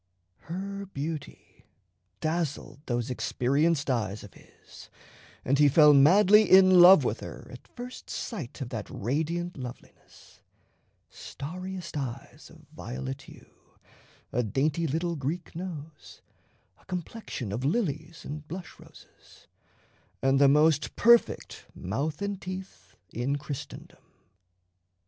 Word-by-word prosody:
Her 200 Hz, +3 st, -5 dB
beauty 155 Hz, -3 st, -7 dB, 0.6 s
dazzled 155 Hz, -4 st, -2 dB
those 120 Hz, 0 st, -1 dB
experienced 140 Hz, +5 st, 0 dB
eyes 105 Hz, -4 st, -2 dB
of 100 Hz, -, -12 dB
his, -, -, -16 dB, 0.6 s
and 135 Hz, +2 st, +2 dB
he 145 Hz, -1 st, +6 dB
fell 150 Hz, +1 st, +7 dB
madly 200 Hz, +9 st, +6 dB
in 185 Hz, -1 st, +7 dB
love 185 Hz, +2 st, +9 dB
with -, -, -1 dB
her -, -, -9 dB
at -, -, -12 dB
first 250 Hz, +1 st, -10 dB
sight 155 Hz, -, -6 dB
of 125 Hz, -, -4 dB
that 110 Hz, -4 st, -6 dB
radiant 160 Hz, -, -2 dB
loveliness: 125 Hz, -2 st, -12 dB, 0.7 s
starriest 180 Hz, +4 st, -7 dB
eyes 135 Hz, -5 st, -6 dB
of -, -, -17 dB
violet 65 Hz, +1 st, -6 dB
hue, -, -, -18 dB, 0.5 s
a 125 Hz, -, +1 dB
dainty 145 Hz, +8 st, 0 dB
little 165 Hz, +4 st, -1 dB
Greek 160 Hz, +5 st, -4 dB
nose, 160 Hz, -4 st, -8 dB, 0.6 s
a -, -, -26 dB
complexion 180 Hz, -, -5 dB
of 115 Hz, +5 st, -3 dB
lilies 160 Hz, -, -2 dB
and 150 Hz, +1 st, -7 dB
blush 180 Hz, +2 st, -8 dB
roses, -, -, -18 dB, 0.7 s
and 135 Hz, +1 st, +2 dB
the 140 Hz, -, +7 dB
most 150 Hz, +2 st, +3 dB
perfect 235 Hz, +1 st, +3 dB
mouth 145 Hz, -, -3 dB
and 200 Hz, -1 st, -3 dB
teeth 185 Hz, -, -8 dB, 0.2 s
in 125 Hz, +5 st, -1 dB
Christendom. 145 Hz, 0 st, -8 dB
155 Hz, 115 wpm, -28 LUFS, 135-180 Hz, 0.7 s, love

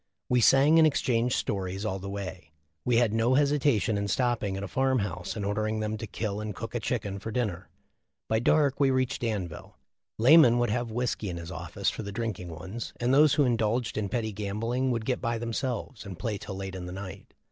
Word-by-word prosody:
We 125 Hz, -1 st, +3 dB
sang 140 Hz, +7 st, +6 dB
and 160 Hz, -, +7 dB
exchanged 125 Hz, -4 st, +1 dB
stories 95 Hz, +1 st, -2 dB
all 95 Hz, -2 st, -2 dB
the 100 Hz, +1 st, -6 dB
way. 95 Hz, -5 st, -6 dB, 0.3 s
We 125 Hz, -, +2 dB
had 115 Hz, -3 st, +3 dB
no 115 Hz, +3 st, +2 dB
hesi 145 Hz, +1 st, +3 dB
tation 115 Hz, -6 st, +2 dB
in 100 Hz, 0 st, -1 dB
stopping 110 Hz, -3 st, 0 dB
at 100 Hz, -, -5 dB
a -, -, -3 dB
farm 130 Hz, +6 st, +1 dB
house 90 Hz, -4 st, -3 dB
and 105 Hz, -3 st, -3 dB
ordering 110 Hz, +2 st, -1 dB
them 110 Hz, 0 st, -2 dB
to 110 Hz, -, -6 dB
kill 105 Hz, 0 st, -3 dB
and 105 Hz, -2 st, -5 dB
cook 115 Hz, -, -6 dB
a 120 Hz, -, -1 dB
chicken 105 Hz, -4 st, -2 dB
for 110 Hz, -, -6 dB
dinner. 105 Hz, -6 st, -2 dB, 0.6 s
By 110 Hz, -, +2 dB
dark 140 Hz, +3 st, +3 dB
we 140 Hz, -2 st, +4 dB
reached 130 Hz, +1 st, 0 dB
Danville. 100 Hz, -9 st, -4 dB, 0.4 s
Lamon 125 Hz, 0 st, +7 dB
would 120 Hz, -3 st, +1 dB
have 120 Hz, +1 st, -1 dB
whiskey 115 Hz, -3 st, -2 dB
in 85 Hz, -, -4 dB
his 85 Hz, +1 st, -7 dB
office 90 Hz, +3 st, -2 dB
for -, -, -6 dB
the 100 Hz, -1 st, -6 dB
drinking 100 Hz, -5 st, -4 dB
ones, 95 Hz, +8 st, -7 dB
and 120 Hz, +2 st, +1 dB
those 150 Hz, +1 st, +6 dB
who 145 Hz, -, +4 dB
indulged 115 Hz, -1 st, 0 dB
in 105 Hz, -2 st, -2 dB
petty 110 Hz, -1 st, -1 dB
gambling 110 Hz, +6 st, -2 dB
would 115 Hz, -3 st, -1 dB
get 125 Hz, 0 st, -1 dB
by 115 Hz, -1 st, -1 dB
themselves 115 Hz, -1 st, -3 dB
and 95 Hz, -4 st, -8 dB
play 110 Hz, -2 st, -3 dB
till 95 Hz, -, -7 dB
late 95 Hz, 0 st, -5 dB
in 90 Hz, -1 st, -6 dB
the -, -, -6 dB
night. 95 Hz, 0 st, -8 dB
110 Hz, 220 wpm, -28 LUFS, 100-125 Hz, 0.6 s, and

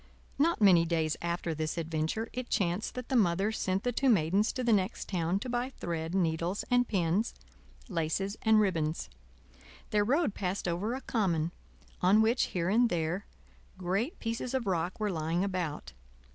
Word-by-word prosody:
Not 335 Hz, +4 st, +3 dB
many 185 Hz, -5 st, +7 dB
days 160 Hz, -2 st, 0 dB
after 170 Hz, -1 st, -2 dB
this 155 Hz, +1 st, -3 dB
adventure, 160 Hz, +7 st, -2 dB
it 250 Hz, 0 st, -5 dB
chanced 180 Hz, +2 st, 0 dB
that 250 Hz, -1 st, -6 dB
the 265 Hz, -, 0 dB
Mother 195 Hz, -1 st, +3 dB
sent 195 Hz, -2 st, -1 dB
the 245 Hz, -, +1 dB
two 270 Hz, +3 st, +1 dB
Maidens 195 Hz, +1 st, +3 dB
to 255 Hz, -, -3 dB
the 235 Hz, -2 st, +3 dB
next 195 Hz, 0 st, 0 dB
town 175 Hz, -1 st, 0 dB
to -, -, -5 dB
buy 245 Hz, +1 st, -1 dB
thread, 165 Hz, 0 st, -3 dB
needles 170 Hz, +1 st, 0 dB
and 245 Hz, 0 st, +4 dB
pins, 190 Hz, +2 st, 0 dB, 0.5 s
laces 190 Hz, +2 st, -1 dB
and 220 Hz, -1 st, +5 dB
ribbons. 165 Hz, -6 st, 0 dB, 0.8 s
Their 210 Hz, -1 st, +3 dB
road 275 Hz, -, +1 dB
passed 190 Hz, -1 st, -2 dB
over 190 Hz, +8 st, -1 dB
a 265 Hz, -, -5 dB
common, 170 Hz, -, 0 dB, 0.5 s
on 200 Hz, +5 st, +5 dB
which 230 Hz, +3 st, +3 dB
here 170 Hz, -2 st, -2 dB
and 230 Hz, +5 st, +4 dB
there 170 Hz, +2 st, -2 dB, 0.5 s
great 195 Hz, -, -1 dB
pieces 230 Hz, +2 st, -3 dB
of 260 Hz, -, -1 dB
rock 180 Hz, 0 st, -1 dB
were 210 Hz, -1 st, 0 dB
lying 165 Hz, +1 st, -1 dB
about. 180 Hz, -, -3 dB
190 Hz, 170 wpm, -30 LUFS, 170-225 Hz, 0.8 s, many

